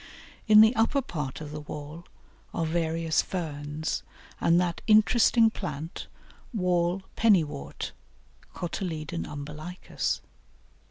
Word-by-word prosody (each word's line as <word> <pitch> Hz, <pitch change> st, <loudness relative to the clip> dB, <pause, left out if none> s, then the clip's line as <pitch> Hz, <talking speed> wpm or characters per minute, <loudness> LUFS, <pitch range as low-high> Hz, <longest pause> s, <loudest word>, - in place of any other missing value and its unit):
In 215 Hz, -1 st, +9 dB
the 220 Hz, +3 st, +6 dB
upper 230 Hz, +5 st, +3 dB
part 150 Hz, -, -5 dB
of 150 Hz, -1 st, -7 dB
the 150 Hz, 0 st, -5 dB
wall 150 Hz, +3 st, -8 dB, 0.5 s
are 165 Hz, -, 0 dB
various 165 Hz, 0 st, +1 dB
Ferns, 155 Hz, -3 st, -3 dB, 0.4 s
and 170 Hz, +1 st, +4 dB
that 175 Hz, -2 st, -1 dB
interesting 225 Hz, +1 st, +5 dB
plant, 160 Hz, -5 st, -6 dB, 0.5 s
Wall 180 Hz, -1 st, +1 dB
Pennywort 160 Hz, -, +1 dB, 0.6 s
(Cotyledon 170 Hz, -2 st, -4 dB
umbilicus). 150 Hz, +4 st, -4 dB
170 Hz, 100 wpm, -28 LUFS, 150-190 Hz, 0.6 s, In